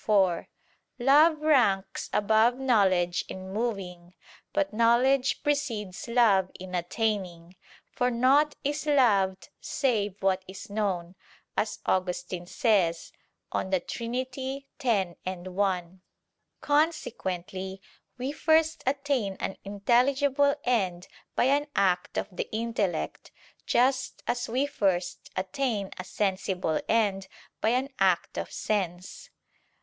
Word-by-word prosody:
4: 190 -5 +2 0.5
Love 300 +5 +5
ranks 245 -11 +2
above 220 +4 +3
knowledge 190 -9 +2
in 190 0 -7
moving, 185 -6 -4 0.4
but 195 +1 0
knowledge 245 +4 +3
precedes 235 -11 -2
love 220 -6 +4
in 185 0 -8
attaining: 180 -2 -2 0.4
for 250 0 +1
"naught 265 +5 +3
is 295 +2 -2
loved 195 -10 +3
save 215 -8 0
what 190 -1 +2
is 190 +2 -10
known," 190 -5 -2 0.4
as 215 0 -1
Augustine 180 -1 -1
says 190 - +1 0.4
(De 190 -1 0
Trin. 235 +6 -5 0.7
x, 195 -8 +1
1). 185 0 -2 0.6
Consequently 190 - -1 0.4
we 255 +2 -3
first 315 +1 +2
attain 270 -8 0
an 195 - -3
intelligible 265 +7 +2
end 190 -8 0 0.3
by - - +3
an 285 +3 +2
act 180 -2 +1
of - - -1
the - - -3
intellect; 215 -6 -2 0.4
just 260 +2 +1
as 245 0 -2
we 255 +5 +1
first 185 -9 -1
attain 200 +2 -2
a - - -3
sensible 185 -3 -1
end 200 -4 +1 0.3
by 220 - +3
an 255 +3 +1
act 190 -3 +2
of - - -5
sense. 185 -3 -3
205 Hz, 110 wpm, -28 LUFS, 185-255 Hz, 0.7 s, Love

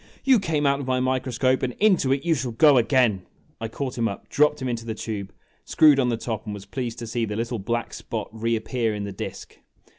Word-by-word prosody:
" - - -28
You 265 -4 +5
came 160 -6 -1
out 140 0 +2
of 140 - -5
my 130 0 +1
microscope, 130 0 +1
and 125 -1 -1
into 185 - +3
it 135 +4 0
you 170 - +3
shall 130 -5 -2
go 145 +2 +6
again! 120 -5 +2 0.2
' - - -37
I 115 - -2
caught 125 +2 -5
him 115 - +2
up, 100 - -7
dropped 150 +1 +3
him 130 - -3
into 120 -2 -3
the 115 -1 -4
tube, 105 -3 -5 0.3
screwed 150 -3 +5
on 125 -2 +2
the 115 - 0
top, 110 -1 -4
and 105 -1 -5
was 100 - -10
pleased 120 -3 -4
to 120 - -6
see 115 +1 -2
the 105 -2 -3
little 115 +1 -2
black 120 +4 -3
spot 110 -3 -5
reappear 115 0 -1
in 105 - -4
the 100 - -5
disk. 95 - -8
120 Hz, 245 wpm, -24 LUFS, 110-135 Hz, 0.3 s, go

